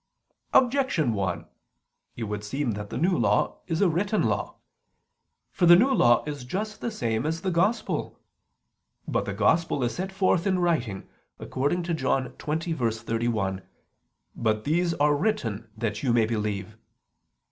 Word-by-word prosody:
Objection 250 - +3
1: 95 -4 -2 0.7
It 120 - -5
would 105 -1 -4
seem 135 +4 -2
that 105 0 -5
the - - -4
New 180 +3 +2
Law - - +1
is 165 0 -1
a 200 - +5
written 195 +6 +1
law. - - -1 1.0
For 175 - +2
the 175 - +10
New 255 +10 +4
Law 120 - +4
is 145 -3 -5
just 210 +11 -4
the 235 - -1
same 115 - -1
as 160 +2 -2
the 190 - -1
Gospel. 195 +7 0 0.9
But - - 0
the - - -3
Gospel 165 -5 +2
is 120 - 0
set 190 +2 -4
forth 190 -1 +1
in 190 -1 +2
writing, 145 - -1 0.3
according 145 +7 -1
to 170 0 -2
John 130 -4 0
20:31: 115 - -1 0.7
"But 110 -1 0
these 170 +3 +1
are 145 0 +3
written 120 - -1
that 110 -2 -2
you 125 -4 +1
may 115 -2 +4
believe." 105 -1 -3
145 Hz, 150 wpm, -26 LUFS, 115-175 Hz, 1.0 s, the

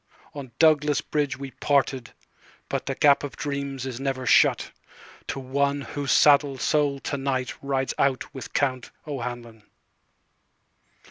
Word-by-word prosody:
On 140 -4 -8
Douglas 150 -3 +4
Bridge 145 -3 -2
we 135 0 -7
parted, 135 -1 0 0.6
butThe - - -3
Gap 145 -1 +5
o' 145 - -3
Dreams 140 -2 -4
is 130 -2 -5
never 135 -1 -3
shut, - - +4 0.6
To - - -4
one 140 +2 -1
whose 140 -2 -4
saddled 140 -2 +4
soul 145 -2 +1
to 140 - -3
nightRides 135 0 -2
out 135 -2 0
with 130 - -8
Count 130 -3 -1 0.2
O'Hanlon. 120 -5 -6
140 Hz, 125 wpm, -25 LUFS, 130-145 Hz, 0.6 s, Gap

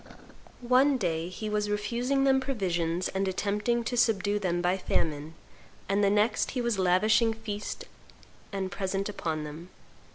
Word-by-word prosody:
One 265 +2 +5
day 170 -5 -1
he 215 +4 -6
was 210 0 -1
refusing 240 +6 0
them 265 -1 +4
provisions 180 -9 -1
and 195 0 -1
attempting 210 +5 0
to 245 - -2
subdue 210 -3 +2
them 175 -3 0
by 175 +1 +2
famine; 155 -4 -2 0.5
and 200 +1 +1
the 200 - +5
next 210 +2 +2
he 260 - -3
was 235 -4 0
lavishing 215 +5 +3
feasts 210 -2 -5 0.7
and 190 -2 -3
presents 195 +1 -2
upon 160 -5 -3
them. 155 +4 -8
205 Hz, 150 wpm, -28 LUFS, 180-225 Hz, 0.7 s, One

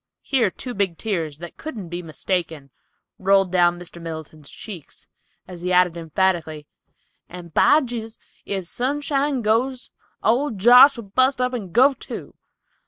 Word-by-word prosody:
Here 255 -7 +1
two 250 +6 -7
big 195 -5 -1
tears, 165 -9 -3
that 170 +1 -10
couldn't 225 - -7
be 175 +1 -4
mistaken, 165 -3 -4 0.5
rolled 195 -1 +3
down 175 -1 +3
Mr. 175 -1 -9
Middleton's 160 -2 -8
cheeks, 190 -9 -10 0.4
as 180 -2 -10
he 180 +1 -2
added 180 -1 +3
emphatically, 165 -2 -1 0.6
"and 175 -2 -10
by 305 - +5
Jehu, 235 -4 -5 0.3
if 195 -2 -3
Sunshine 275 - -1
goes, 245 +4 0 0.3
old 240 0 +1
Josh'll 245 +4 +7
bust 255 +7 +2
up 250 0 0
and 205 -8 -5
go, 260 +7 +5
too!" - - -9
195 Hz, 140 wpm, -22 LUFS, 170-250 Hz, 0.6 s, Josh'll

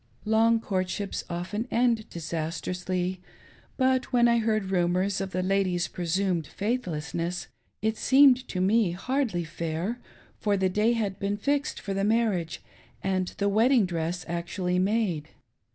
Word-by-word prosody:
Long 225 +1 +4
courtships 195 -1 -2
often 185 +7 -3
end 235 -2 +1
disastrously; 175 +3 -3 0.6
but 260 0 +2
when 240 -1 +5
I 235 0 +4
heard 215 -3 0
rumors 185 +2 +1
of 195 - -3
the 185 0 -2
lady's 185 -3 +1
presumed 175 -1 -1
faithlessness, 175 - -2 0.4
it 220 0 0
seemed 265 -1 +5
to 185 - -4
me 195 -1 +3
hardly 235 -2 -1
fair, 165 +7 -3 0.4
for 205 -1 +1
the 190 -1 +2
day 210 +5 +2
had 210 -5 -2
been 200 +1 -1
fixed 285 +6 -1
for 200 - -4
the 195 0 -1
marriage 210 -6 0 0.4
and 185 -1 0
the 200 - +1
wedding 225 +3 +4
diress 175 0 -3
actually 180 +1 -1
made. 190 -6 0
195 Hz, 135 wpm, -27 LUFS, 175-225 Hz, 0.6 s, when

